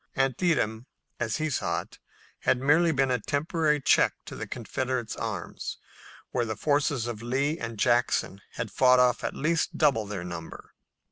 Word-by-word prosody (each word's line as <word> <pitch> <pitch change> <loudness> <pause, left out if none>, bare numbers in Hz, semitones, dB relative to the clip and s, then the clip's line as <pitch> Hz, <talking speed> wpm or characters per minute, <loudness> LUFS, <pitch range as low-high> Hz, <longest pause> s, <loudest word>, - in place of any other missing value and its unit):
Antietam, 135 -4 +1 0.3
as 115 -1 -1
he 155 0 -1
saw 150 - -1
it, - - -17 0.4
had 125 - +2
merely 155 +5 +4
been 135 -3 +1
a 125 - +1
temporary 150 - 0
check 135 - +4
to - - -8
the - - -5
Confederate 125 -4 -3
arms, - - -5 0.5
where 125 - +1
the 110 -2 -3
forces 145 -4 +1
of 115 -3 -5
Lee 140 +7 0
and 115 -1 -5
Jackson 110 -3 +1
had 115 -3 -4
fought 125 +4 +5
off 125 -1 +3
at - - -2
least 165 +3 0
double 135 -9 +3
their 100 -3 -4
number. 85 -2 -8
130 Hz, 160 wpm, -27 LUFS, 115-145 Hz, 0.5 s, fought